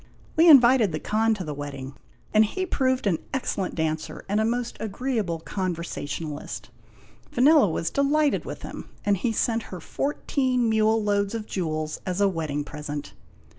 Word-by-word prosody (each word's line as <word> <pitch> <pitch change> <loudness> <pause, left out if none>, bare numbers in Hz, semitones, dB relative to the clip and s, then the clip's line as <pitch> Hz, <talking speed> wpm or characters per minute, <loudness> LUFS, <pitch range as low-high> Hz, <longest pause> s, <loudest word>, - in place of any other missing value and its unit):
We 330 +2 +6
invited 250 - +7
the 155 - -3
Khan 220 +4 +1
to 195 - -5
the 150 -3 -4
wedding, 140 -2 -6 0.4
and 215 - +7
he 375 - -2
proved 260 -7 0
an 180 -6 +2 0.2
ex 265 - -1
cellent 190 -2 -3
dancer 160 -1 -3
and 205 +2 +1
a - - +2
most 240 +1 -1
agreeable 215 -5 -2
conversationalist. 165 -4 -4 0.6
Vanella 270 - +5
was 165 +1 -2
delighted 290 +1 +2
with - - -7
him, - - -8 0.2
and 205 -1 +3
he 225 +5 -1
sent 225 +1 0
her 185 - -6
fourteen 255 - 0
mule 220 0 +3
loads 205 0 +1
of 220 -2 -4
jewels 155 -6 -3
as 185 0 -3
a 200 - +5
wedding 155 -5 -2
present. 150 0 -6
205 Hz, 165 wpm, -25 LUFS, 160-245 Hz, 0.6 s, invited